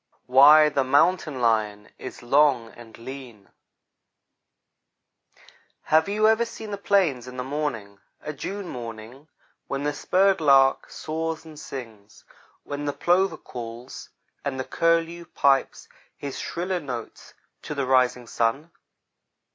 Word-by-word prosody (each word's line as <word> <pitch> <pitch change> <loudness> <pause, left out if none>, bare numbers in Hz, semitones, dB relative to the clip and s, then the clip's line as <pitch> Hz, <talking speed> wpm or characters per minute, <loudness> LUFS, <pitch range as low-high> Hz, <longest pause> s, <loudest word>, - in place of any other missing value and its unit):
WHY 145 +4 +7
THE 140 -2 +1
MOUNTAIN 145 +1 +2
LION 105 -3 0
IS - - -9
LONG 130 -2 +3
AND 115 -2 -14
LEAN 120 -4 -10 2.3
HAVE 160 +4 +2
you 215 +1 +2
ever 220 +1 +4
seen 220 -2 -8
the 200 - -4
plains 175 - +1
in 125 0 -9
the 125 - -3
morning 125 -8 -4 0.2
a 150 - -6
June 195 +6 -6
morning, 120 +3 -9 0.4
when 140 0 -3
the 145 0 -1
spurred 190 +4 +2
lark 135 -2 +4
soars 160 +1 -4
and 155 -2 -12
sings 110 -8 -10 0.4
when 145 0 -5
the 145 - -1
plover 175 0 +1
calls, 120 0 -9 0.3
and 135 -2 -3
the - - -1
curlew 165 +1 0
pipes 140 -4 +1 0.3
his 140 -2 -6
shriller 180 +1 -3
notes 125 -7 -8 0.3
to 150 - -6
the 140 -1 -1
rising 125 -1 +2
sun? 120 +8 -1
140 Hz, 130 wpm, -24 LUFS, 125-165 Hz, 2.3 s, WHY